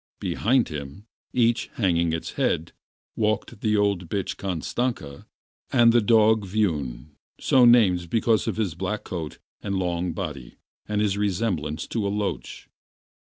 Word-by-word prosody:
Behind 125 +2 +1
him, 75 +5 -7 0.3
each 120 -2 +2
hanging 85 -6 +1
its 80 0 -3
head, 80 +2 -1 0.4
walked 110 -2 -1
the 110 -1 +2
old 100 -4 0
bitch 100 -1 -2
Kashtanka, 95 - -3 0.4
and 115 -1 +5
the 120 - +5
dog 110 0 +4
Viun, 80 - -2 0.3
so 130 -2 +4
named 95 -8 +4
because 115 +1 +1
of - - -2
his 105 -7 -1
black 95 +5 -3
coat 80 -4 -6 0.2
and 100 -1 -3
long 90 -2 -1
body 70 -6 -6 0.3
and 105 0 0
his 100 -1 0
resemblance 90 -6 -1
to 110 -4 -2
a - - 0
loach. 105 0 -4
100 Hz, 140 wpm, -25 LUFS, 85-110 Hz, 0.4 s, and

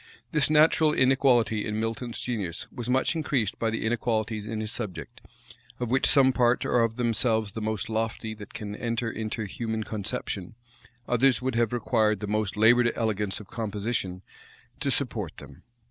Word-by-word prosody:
This 150 -3 +2
natural 155 0 +5
inequality 130 -5 +3
in 105 0 -2
Milton's 115 +1 -3
genius 100 -8 -3
was 120 -1 -6
much 130 +6 +2
increased 140 -9 -1
by 115 - +1
the 110 0 -2
inequalities 110 -2 -1
in 110 0 -3
his 110 0 -2
subject; 115 0 -5 0.6
of 120 -2 -2
which 135 +1 +4
some 130 -2 +5
parts 120 -1 +2
are 125 - +2
of 115 -1 +1
themselves 115 -3 +1
the 110 - -6
most 110 -1 -2
lofty 110 0 -2
that 105 -2 -11
can 105 -1 -5
enter 115 0 -2
into 110 0 -4
human 110 +2 -3
conception; 105 -1 -4 0.5
others 125 0 +3
would 130 0 -2
have 115 -1 +1
required 110 -3 +1
the 105 - -4
most 105 -1 -1
labored 120 +2 +5
elegance 105 -3 -1
of 105 - -12
composition 105 -4 -3 0.6
to - - -1
support - - -1
them. - - -12
115 Hz, 165 wpm, -27 LUFS, 105-120 Hz, 0.6 s, natural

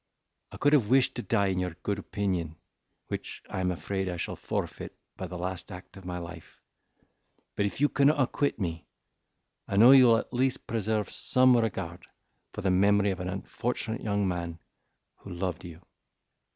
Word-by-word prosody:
I - - -9
could 145 +1 +3
have 120 -8 +4
wished 130 0 +4
to - - -2
die 100 -4 +1
in 95 -1 0
your 90 -2 -3
good 100 -1 -1
opinion, 90 -6 -2 0.5
which - - -6
I - - -3
am 90 -1 +1
afraid 95 +2 -2
I 90 - -4
shall - - -4
forfeit - - -5 0.2
by - - -5
the 90 - -7
last 90 +2 -5
act 90 0 -10
of 95 -2 -12
my 90 -1 -4
life; 85 -1 -10 1.0
but, 100 - +1
if 100 - -7
you 145 - +5
cannot 145 +1 +3
acquit 140 0 0
me, 80 -5 -4 0.8
I 95 - -2
know 120 +5 +9
you 130 -2 +8
will 115 -1 +6
at 115 - -5
least 130 +1 0
preserve 110 -2 -1
some 130 0 +4
regard 95 -7 -2 0.4
for - - -6
the 95 -2 +1
memory 100 +2 +4
of 95 - -4
an 90 0 -3
unfortunate 110 +4 -3
young 100 -2 0
man 85 -2 -3 0.6
who - - -12
loved 90 -1 -3
you. 85 0 -11
100 Hz, 180 wpm, -28 LUFS, 90-115 Hz, 1.0 s, know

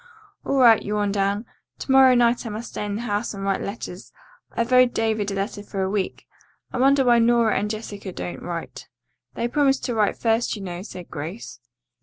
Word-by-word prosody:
"All 275 - -1
right," 235 -4 +6
yawned 205 -1 -1
Anne. 200 +3 0 0.3
"To - - -4
morrow 265 -1 +7
night 240 0 +3
I 230 - -5
must 220 +3 -6
stay - - -5
in 205 -1 -3
the 220 - -3
house 210 -1 -2
and 195 - -6
write 195 0 0
letters. 200 -2 -7 0.4
I've 235 +2 -1
owed 250 -1 +5
David 220 -2 0
a 200 - -3
letter 200 +1 -3
for 200 -1 -4
a 190 - -1
week. 200 -2 -3 0.5
I 255 - -2
wonder 270 +1 +4
why 240 -1 +5
Nora 235 -1 +3
and 210 - -2
Jessica 210 -3 -6
don't 175 - -6
write." 170 -1 -6 0.5
"They 235 - -1
promised 270 +1 +1
to 245 - -1
write 215 -2 +1
first, 225 +1 +1
you 205 - -8
know," 175 -1 -5
said 180 -3 -10
Grace. 165 +9 -7
215 Hz, 205 wpm, -23 LUFS, 200-240 Hz, 0.5 s, morrow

